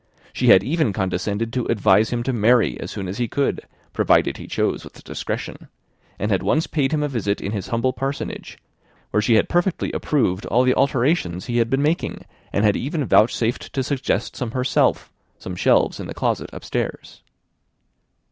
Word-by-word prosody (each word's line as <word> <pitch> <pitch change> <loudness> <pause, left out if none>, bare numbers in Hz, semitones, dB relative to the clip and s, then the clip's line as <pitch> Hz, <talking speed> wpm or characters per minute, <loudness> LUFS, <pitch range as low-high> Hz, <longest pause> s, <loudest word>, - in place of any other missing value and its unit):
She - - 0
had 95 - +7
even 150 - 0
condescended 100 +4 -2
to 125 -2 -1
advise 105 -1 +3
him 120 -1 -2
to 130 - -1
marry 115 - +3
as - - -6
soon 95 - -5
as 95 +5 -5
he 120 - 0
could, 140 +5 -1 0.3
provided - - +2
he - - -9
chose - - -1
with - - -13
discretion; - - -5 0.5
and 105 +2 -2
had 95 - +2
once 155 +2 +1
paid 140 -4 0
him 150 -1 0
a - - +1
visit 105 -7 -1
in 100 - -4
his 100 -4 -4
humble 120 +2 0
parsonage, 135 +2 -5 0.5
where 105 - +2
she 110 +2 +3
had 110 - +3
perfectly 175 +1 0
approved 110 -10 0
all 125 +2 +3
the 130 0 +3
alterations 130 - +1
he 120 -2 -2
had 115 -1 +2
been 135 +2 +1
making, 160 +3 -1 0.3
and 100 - +1
had 105 - +4
even 145 +2 -2
vouchsafed 115 +1 +2
to 135 - 0
suggest 135 0 -2
some 125 - -3
herself, 125 0 +1 0.3
some 90 - -7
shelves - - +2
in - - -6
the - - -7
closets - - -1
upstairs. - - -5
120 Hz, 185 wpm, -22 LUFS, 105-135 Hz, 0.5 s, had